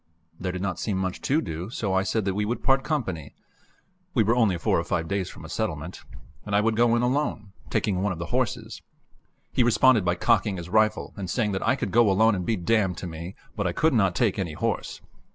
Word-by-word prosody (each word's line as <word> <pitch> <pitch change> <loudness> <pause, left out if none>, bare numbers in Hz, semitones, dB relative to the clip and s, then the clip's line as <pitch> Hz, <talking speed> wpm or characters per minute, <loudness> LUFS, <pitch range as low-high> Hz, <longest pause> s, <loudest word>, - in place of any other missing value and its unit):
There 90 0 -2
did 90 +1 -4
not 95 -3 -2
seem 105 -4 -1
much 95 -1 -2
to 150 +4 +1
do, 85 +2 -5
so 105 -5 -2
I 95 - +3
said 100 +2 -1
that 95 - 0
we 105 +2 -1
would 115 +4 -3
part 135 0 +3
company 95 - -3 0.8
we 115 - +4
were 115 +3 +2
only 110 -7 +3
four 85 - +1
or - - -1
five 80 - -2
days 100 -1 -2
from - - -11
a - - -7
settlement 80 +4 -4 0.4
and 100 - -2
I - - +5
would 110 +1 +1
go 120 +1 +4
in 120 - +1
alone, 125 -6 -1 0.2
taking 95 -3 0
one 100 0 0
of 90 - -4
the 85 0 -6
horses. - - -2 0.7
He - - +2
responded 120 -1 +5
by 90 0 +1
cocking 105 0 +2
his 85 0 -7
rifle 110 +1 +1
and 95 -3 -5
saying 105 +3 0
that 95 - -2
I 130 - +4
could 115 -8 -3
go 120 -2 +5
alone 110 +4 +4
and 90 -3 -3
be 115 - +2
damned 95 -1 +1
to - - -6
me, 85 +2 -7 0.2
but 100 -4 -1
I 85 - -1
could 160 - +2
not 95 -6 +2
take 105 -3 +1
any 85 -5 -2
horse. - - -3
100 Hz, 240 wpm, -26 LUFS, 90-115 Hz, 0.8 s, I